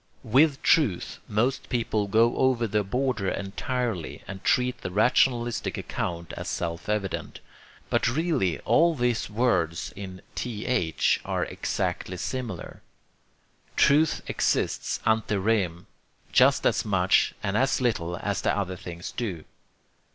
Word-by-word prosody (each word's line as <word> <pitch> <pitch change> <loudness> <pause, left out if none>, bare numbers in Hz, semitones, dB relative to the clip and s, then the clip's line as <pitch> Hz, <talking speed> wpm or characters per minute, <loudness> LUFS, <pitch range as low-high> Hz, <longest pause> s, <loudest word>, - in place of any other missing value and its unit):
With 135 +4 +3
'truth' 120 - +2
most 120 +6 0
people 110 -4 0
go 115 +4 +3
over 130 -3 +2
the 105 -1 0
border 120 -1 -1
entirely, 100 -1 -3
and 95 -1 -8
treat 125 0 +1
the - - -4
rationalistic 120 +4 +2
account 85 -1 -4
as - - -6
self 85 +2 -3
evident. 105 -3 -2 0.5
But - - +2
really 125 - +1
all 170 0 +3
these 120 -3 0
words 95 -8 0
in 95 -2 -8
TH 110 -6 0
are - - -1
exactly 90 - -3
similar. 115 -2 -5 0.9
Truth 150 +3 +4
exists - - 0
ante 110 -1 +2
rem 95 -4 0 0.5
just - - +4
as - - +2
much 95 -3 +2
and 100 0 -1
as 130 +4 +2
little 90 -9 -1
as 100 +2 -2
the - - +1
other 95 -2 -2
things 85 -1 -7
do. 95 -10 -4
105 Hz, 125 wpm, -26 LUFS, 95-125 Hz, 0.9 s, Truth